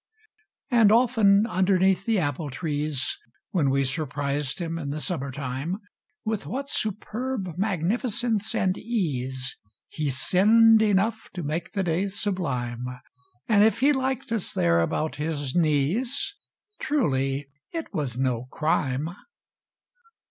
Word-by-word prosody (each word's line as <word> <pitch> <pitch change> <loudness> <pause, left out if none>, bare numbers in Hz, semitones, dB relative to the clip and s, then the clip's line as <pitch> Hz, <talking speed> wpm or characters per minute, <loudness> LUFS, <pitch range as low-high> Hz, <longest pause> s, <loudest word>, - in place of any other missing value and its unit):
|66] 240 - +5
And 210 -2 +7
often, 220 -4 +5
underneath 190 -1 +2
the 225 -2 +3
apple 145 -2 -1
trees, 145 -1 -2 0.3
When 155 -8 +2
we 140 +1 +2
surprised 140 0 -2
him 165 -2 -3
in 140 -3 -4
the 150 +2 -3
summer 150 -5 -3
tune, 135 +6 -3 0.5
With 220 -1 -2
what 275 +2 -4
superb 215 -2 -3
magnificence 215 - 0
and 185 -1 +1
ease 130 - -2 0.3
He 150 -2 -2
sinned 220 - +5
enough 215 +2 +1
to 175 - -4
make 155 +3 -3
the 195 -2 0
day 175 +3 0
sublime 140 - -2
I 125 0 -7 0.5
And 210 -2 +5
if 225 +2 +3
he 290 +2 +5
liked 265 -2 -2
us 225 -5 -1
there 85 0 +3
about 155 - -1
his 145 -3 -2
knees,. 180 - +1 0.4
Truly 140 - 0 0.2
it 330 -1 -5
was 135 -6 -2
no 125 -2 0
crime. 145 0 0
175 Hz, 130 wpm, -26 LUFS, 140-220 Hz, 0.5 s, And